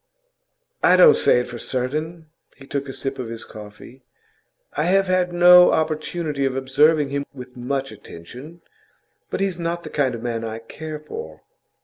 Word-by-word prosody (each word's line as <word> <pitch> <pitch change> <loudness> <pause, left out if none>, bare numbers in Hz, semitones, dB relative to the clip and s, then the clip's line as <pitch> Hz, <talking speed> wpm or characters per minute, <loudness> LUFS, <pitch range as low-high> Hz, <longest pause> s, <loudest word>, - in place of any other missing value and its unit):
'I - - +5
don't 460 -3 +8
say 125 - +3
it - - -7
for 120 -1 -8
certain.' 155 +8 -4 0.3
He 135 - -15
took 140 0 -4
a - - -3
sip 135 0 -5
of 125 - -4
his 115 0 -7
coffee. 105 +5 -13 0.7
'I 150 - 0
have 195 +2 +3
had 185 -1 +1
no 180 0 +7
opportunity 155 -1 -2
of 135 -1 0
observing 140 +3 +2
him 140 0 -2
with 125 -1 -11
much 135 +2 -3
attention. 120 - -12 0.7
But - - -3
he's 190 -3 -1
not 170 0 -3
the - - -8
kind 135 -4 0
of 115 - -9
man 115 -2 -3
I 110 0 -5
care 155 +7 -8
for. 455 - -9
140 Hz, 170 wpm, -22 LUFS, 125-170 Hz, 0.7 s, don't